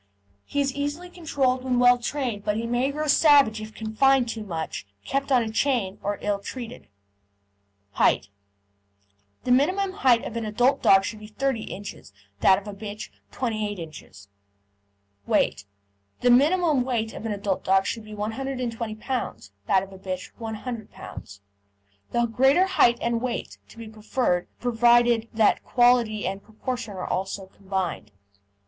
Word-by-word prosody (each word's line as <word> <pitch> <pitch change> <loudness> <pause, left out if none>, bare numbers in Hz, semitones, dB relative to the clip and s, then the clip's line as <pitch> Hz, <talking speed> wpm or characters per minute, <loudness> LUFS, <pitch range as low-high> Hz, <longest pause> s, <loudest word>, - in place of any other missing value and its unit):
He 285 - -3
is 275 -1 0
easily 290 +6 -4
controlled 270 -7 0
when 255 -1 0
well 245 0 +6
trained, 240 -5 -3
but 210 0 0
he 230 - -2
may 240 +4 0
grow 305 +2 -3
savage 280 -7 +5
if 215 0 -9
confined 245 +4 +2
too 225 -1 -4
much, 165 - -5 0.2
kept 275 +1 -2
on 235 -4 +3
chain, 225 -6 0
or 205 0 -2
ill 205 -1 0
treated. 240 +3 -8 1.0
HEIGHT 100 - +2 1.1
The 250 - -1
minimum 370 +10 +3
height 245 -3 +4
of 235 - -6
an 230 - -2
adult 240 +5 +2
dog 195 0 +6
should 215 - -5
be 210 - -10
30 245 +1 -2
ins.; 195 - -9 0.3
that 190 - +5
of 200 +1 -8
a 205 - -5
bitch, 205 +1 -7 0.2
28 215 -4 -2
ins. 155 - -10 1.0
WEIGHT 100 - +1 0.6
The 245 - +4
minimum 300 +1 +4
weight 235 -3 -2
of 225 - -6
an - - -2
adult 200 -2 -2
dog 195 0 +3
should 225 - -3
be 215 0 -10
120 230 0 -3
lbs.; 230 - -4 0.2
that 190 -1 +3
of 195 0 -11
a 190 - -12
bitch, 185 -1 -5
100 225 0 -6
lbs. 100 0 -10 0.7
The 235 0 +1
greater 265 +10 +4
height 240 -11 +4
and 235 -1 0
weight 245 -2 -4
to - - -16
be 230 -1 -8
preferred, 215 -3 -1
provided 240 -1 +3
that 220 -1 +2
quality 240 -3 +3
and 195 +1 -3
proportion 225 0 -5
are 185 - -4
also 195 +1 -3
combined. 190 - -4
230 Hz, 155 wpm, -25 LUFS, 205-255 Hz, 1.1 s, well